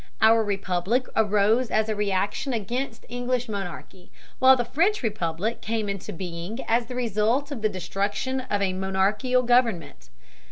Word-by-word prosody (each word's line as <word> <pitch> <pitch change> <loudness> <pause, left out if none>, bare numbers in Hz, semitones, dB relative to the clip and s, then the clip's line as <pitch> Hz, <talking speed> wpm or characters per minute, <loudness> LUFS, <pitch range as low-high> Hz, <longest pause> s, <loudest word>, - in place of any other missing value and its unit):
Our 225 +1 +5
republic 200 +4 0
arose 215 +3 +3
as 215 0 +1
a 220 - 0
reaction 205 +6 -1
against 235 +3 -3
English 245 0 -2
monarchy, 190 -3 -7 0.3
while 260 0 +7
the 245 -2 -1
French 350 - +1
republic 205 0 -2
came 220 -1 -2
into 200 -2 -4
being 175 +4 -6
as 230 +1 +2
the 250 - -6
result 240 +4 0
of 260 -6 -5
the 215 - +2
destruction 200 +7 -2
of 205 -1 +1
a 190 -1 0
monarchical 195 +7 +1
government. 225 - +1
215 Hz, 150 wpm, -25 LUFS, 195-245 Hz, 0.3 s, while